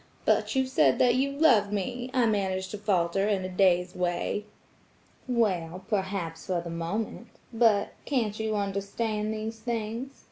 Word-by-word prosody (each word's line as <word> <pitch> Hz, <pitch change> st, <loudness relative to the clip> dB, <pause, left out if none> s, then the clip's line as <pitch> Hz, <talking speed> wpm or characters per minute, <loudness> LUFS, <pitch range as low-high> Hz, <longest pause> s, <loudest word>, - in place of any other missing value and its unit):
'But -, -, +2 dB
you 265 Hz, 0 st, +3 dB
said 150 Hz, -, +3 dB
that 245 Hz, -1 st, +4 dB
you 270 Hz, +3 st, +1 dB
loved 240 Hz, -9 st, +4 dB
me.' 245 Hz, +5 st, -3 dB
I 255 Hz, -2 st, +3 dB
managed 190 Hz, -3 st, 0 dB
to 210 Hz, -, -5 dB
falter 195 Hz, -1 st, +1 dB
in 195 Hz, -3 st, 0 dB
a -, -, -4 dB
dazed 180 Hz, -1 st, +2 dB
way. 180 Hz, +3 st, -1 dB, 0.8 s
'Well, 185 Hz, -7 st, 0 dB
perhaps, 190 Hz, -5 st, -2 dB
for 185 Hz, -2 st, 0 dB
the 170 Hz, 0 st, -6 dB
moment. 200 Hz, +8 st, -3 dB, 0.3 s
But–can't 225 Hz, 0 st, +1 dB
you 220 Hz, -1 st, -1 dB
understand 210 Hz, +2 st, -2 dB
these 220 Hz, +1 st, -4 dB
things? 230 Hz, +3 st, -3 dB
205 Hz, 145 wpm, -28 LUFS, 185-230 Hz, 0.8 s, that